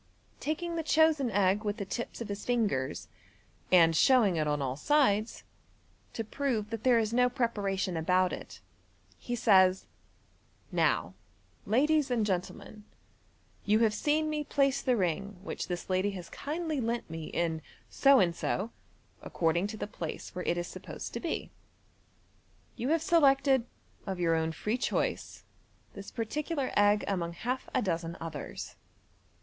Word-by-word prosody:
Taking 335 +3 -3
the - - 0
chosen 315 -4 +3
egg 200 0 +2
with 205 0 -2
the 200 - -4
tips 235 +4 -5
of 230 - -5
his 200 0 -5
fingers, 210 - -1 0.6
and 165 -3 +6
showing 225 - +5
it 155 -2 0
on 150 0 0
all 130 -2 -2
sides, 220 - +1 0.7
to 225 - -3
prove 225 -2 -2
that 225 0 -4
there 250 -2 +5
is 225 0 0
no 250 +1 +4
pre 250 -1 +1
paration 195 -4 -2
about 180 +3 +2
it, - - -8 0.6
he 245 - -3
says, 190 -5 +4 0.4
" - - -36
Now, - - +1 0.5
ladies 290 +6 +3
and 235 -4 +1
gentlemen, 195 +2 -4 0.8
you 210 +1 +3
have 220 -2 +3
seen 300 +7 +1
me 305 -1 -1
place 275 -2 +1
the 250 -3 +1
ring 195 +2 -1
which - - -5
this 175 -1 -4
lady 185 +2 +1
has 175 -2 -9
kindly 310 -1 -3
lent 230 0 -2
me 160 -1 -6
in 165 -1 -2 0.2
' - - -32
so 275 -1 +7
and 170 -4 +2
so 215 +6 -2 0.2
' - - -35
" - - -35
(according 170 +3 0
to 215 +1 -7
the - - -3
place 170 -6 -7
where 180 - -5
it 175 - +1
is 175 - -2
supposed - - -8
to - - -3
be). 335 - -4 0.6
" - - -36
You 245 - -3
have 325 0 +2
selected, 275 -7 +4 0.4
of 190 -2 -3
your 170 -2 +2
own 160 0 0
free 210 +9 -2
choice, - - -2 0.5
this 200 -1 -9
particular 280 +5 -3
egg 205 0 +4
among 170 -4 -2
half 250 +9 -4
a 255 - +2
dozen 170 -3 -2
others. 160 -4 -7
210 Hz, 165 wpm, -30 LUFS, 180-260 Hz, 0.8 s, so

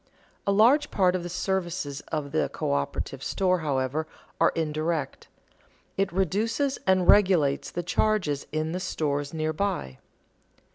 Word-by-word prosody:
A - - +4
large 245 +9 +4
part 185 -2 +2
of 185 - -1
the 175 - -6
services 175 -5 -2
of 150 -3 -3
the 155 - +1
coöperative 70 0 -2
store, 185 -1 +1
however, 145 0 -1 0.3
are - - +5
indirect; 155 -1 -2 0.7
it 195 0 0
reduces 215 - 0
and 185 -1 +3
regulates 175 -9 +4
the 175 - -4
charges 180 -5 0
in 155 +1 -1
the 180 - -2
stores 145 -6 -2
near 155 -1 -2
by. 170 - -2
170 Hz, 135 wpm, -26 LUFS, 150-190 Hz, 0.7 s, are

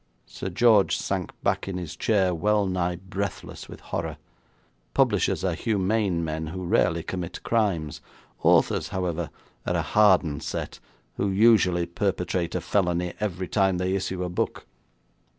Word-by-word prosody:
Sir 95 - -6
George 110 0 +4
sank - - -2
back - - 0
in 95 -2 -3
his 85 -3 -6
chair 95 -5 +2
wellnigh 90 -1 +1
breathless 100 0 -5
with - - -10
horror. - - -4 0.8
Publishers - - +2
are 95 -2 +1
humane 100 -2 0
men 80 0 -3
who 90 +3 -5
rarely 85 -1 +2
commit 90 -2 -5
crimes; 95 -10 0 0.4
authors, - - +3
however, 85 -3 -2 0.4
are - - +1
a - - +1
hardened 95 -8 +3
set - - -5 0.4
who 100 - 0
usually 95 -4 +4
perpetrate 90 -1 -2
a 90 - -1
felony 90 -1 0
every 95 -3 -2
time 95 -2 +2
they 90 +1 0
issue 95 -1 -2
a 90 - -3
book. 90 - -2
90 Hz, 140 wpm, -26 LUFS, 85-100 Hz, 0.8 s, George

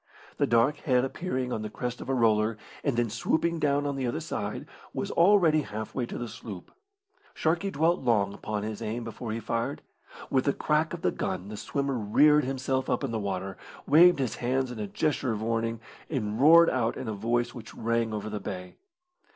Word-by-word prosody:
The - - +2
dark 120 +6 +3
head 125 -4 +2
appearing 130 -4 -3
on 110 - -2
the 110 - -4
crest 125 +3 -4
of - - -7
a - - +2
roller, 110 -2 +2 0.3
and 140 -5 0
then 120 -1 +2
swooping 165 +8 0
down 145 -1 +1
on 140 -1 -1
the 130 -2 -1
other 135 +6 -2
side, 105 -10 -4 0.3
was - - -2
already 170 -4 +5
half 110 -4 -6
way 125 -3 -2
to - - -6
the 120 - -4
sloop. 110 -4 -9 0.6
Sharkey 170 +5 0
dwelt 165 +1 +1
long 100 -4 +2
upon 105 0 -4
his 110 0 -5
aim 115 +2 -3
before 115 0 -6
he 115 - -2
fired. 115 +1 -3 0.5
With 130 -1 +2
the 140 - +2
crack 155 +3 0
of 170 - -12
the - - +3
gun 95 +1 -3
the 105 - -6
swimmer 140 +5 -2
reared 150 +8 +4
himself 130 0 -1
up - - 0
in 135 - -2
the 115 - -1
water, 95 -1 -3 0.3
waved 170 +4 +7
his 130 -4 -2
hands 130 +1 0
in 120 - -7
a 105 - -3
gesture 130 +1 0
of 110 0 -4
warning, 115 0 -1 0.3
and 110 -5 -2
roared 165 +3 +8
out 120 -2 0
in 130 - -5
a 110 - -2
voice 120 +3 0
which 115 -2 -10
rang 115 0 0
over 105 0 -4
the 105 -1 -4
bay. 90 -2 -7
120 Hz, 210 wpm, -28 LUFS, 110-140 Hz, 0.6 s, roared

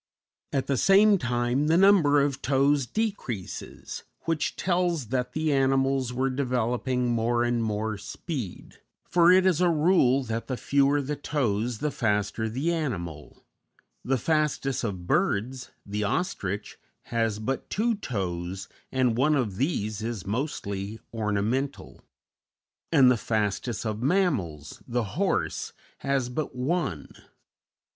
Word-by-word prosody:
At 135 -2 0
the 140 -1 0
same 200 - +5
time, 120 +3 0
the 165 +2 +4
number 175 -7 +5
of 140 -1 -1
toes 140 -1 +2
decreases, 195 - -4 0.2
which 165 -2 -1
tells 175 - 0
that 125 0 -1
the 155 -1 0
animals 135 -1 +2
were 130 +2 0
developing 125 -1 0
more 120 +1 +1
and 120 -1 +1
more 110 -1 -2
speed; 125 - -6 0.2
for 175 0 +4
it 185 0 +5
is 180 -3 +3
a 180 - +4
rule 150 -5 +3
that 115 -1 -4
the 130 - -2
fewer 140 +2 +2
the 150 +2 -2
toes 120 -6 -1
the 150 +6 -1
faster 105 -1 0
the 140 +10 -1
animal: 85 - -5 0.6
the 135 +1 +1
fastest 150 -1 0
of 95 -6 -3
birds, 125 +8 0 0.2
the 105 +1 -2
ostrich, 105 - -2 0.3
has 115 -2 +1
but 125 +5 -3
two 230 +3 +1
toes, 95 - -4 0.2
and 130 -3 +2
one 150 +4 +3
of 110 -9 -1
these 110 - -1
is 110 -4 -4
mostly 100 -3 -3 0.2
ornamental; 115 +6 -2 0.9
and 135 -6 +6
the 125 - +2
fastest 110 +2 -1
of 110 0 -2
mammals, 125 - 0
the 120 -1 0
horse, 155 - -1 0.3
has 135 -2 0
but 130 +2 -4
one. 130 - -2
125 Hz, 130 wpm, -27 LUFS, 110-150 Hz, 0.9 s, and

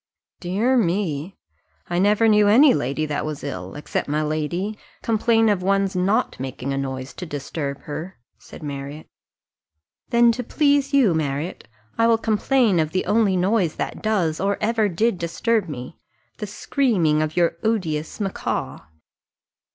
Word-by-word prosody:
"Dear 210 +9 +1
me! 175 - -1 0.5
I 175 0 -1
never 210 +3 +4
knew 210 -1 +5
any 255 +6 +7
lady 140 - -1
that 150 -1 -2
was 155 -1 -5
ill, 95 -10 -6
except 150 - -3
my 150 +1 0
lady, 155 +7 -2 0.3
complain 225 0 +2
of 205 -4 +2
one's 195 0 +1
not 200 +7 +1
making 130 +1 -4
a - - -2
noise 130 -1 -5
to 180 - -7
disturb 140 -1 -5
her," 160 +5 -7 0.2
said - - -13
Marriott. 140 +1 -6 1.0
"Then 235 -1 +5
to 245 +2 -3
please 285 +1 +2
you, 265 - +4
Marriott, 150 +1 -3 0.3
I 230 - +5
will 230 -1 +4
complain 225 -2 +2
of 155 0 -1
the 185 - 0
only 210 -4 +2
noise 185 -3 +1
that - - -4
does, 185 -8 0
or 200 +1 0
ever 220 -1 +1
did 195 +2 0
disturb 180 +4 0
me 125 +1 -8 0.4
the 210 - -4
screaming 195 - +1
of 155 +1 -3
your 170 -1 +2
odious 165 -9 -1
macaw." 195 -2 -3
185 Hz, 150 wpm, -22 LUFS, 155-220 Hz, 1.0 s, any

